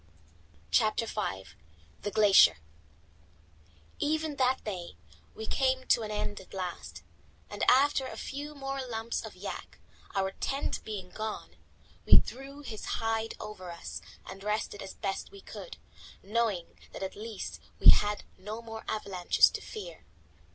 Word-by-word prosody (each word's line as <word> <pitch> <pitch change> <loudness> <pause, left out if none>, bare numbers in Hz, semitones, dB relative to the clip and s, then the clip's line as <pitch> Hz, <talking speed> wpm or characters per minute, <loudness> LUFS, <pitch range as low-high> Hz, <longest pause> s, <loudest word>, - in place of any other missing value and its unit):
CHAPTER 215 - +3
V 100 - -2 0.6
THE - - -1
GLACIER 200 - +7 1.4
Even 310 0 0
that 260 0 +3
day 180 - -5 0.5
came 260 -1 +2
to - - +6
an 215 - -3
end 210 -1 -2
at 190 - -12
last, 180 -2 -5 0.5
and - - -3
after 270 0 +5
a - - -7
few 290 +2 -5
more 270 -1 -3
lumps 230 -2 -2
of - - -8
yak, - - -6 0.4
our 190 -1 +1
tent 275 +8 -2
being 195 -4 -5
gone, 215 0 -5 0.5
we - - +10
drew 275 +2 -1
his 225 -7 -7
hide 225 -1 0
over 185 -4 -7
us 170 0 -6 0.3
and 195 +1 -8
rested 210 -1 -1
as 190 - -7
best 195 -1 -3
we 400 - -12
could, - - -9 0.5
knowing 210 -4 0
that - - -5
at 190 - -4
least 215 -1 -6 0.2
we - - +11
had 210 0 +2 0.2
no 210 +4 -5
more 225 -1 -7
avalanches 195 -4 +3
to - - -4
fear. 180 -6 -8
215 Hz, 140 wpm, -31 LUFS, 195-260 Hz, 1.4 s, we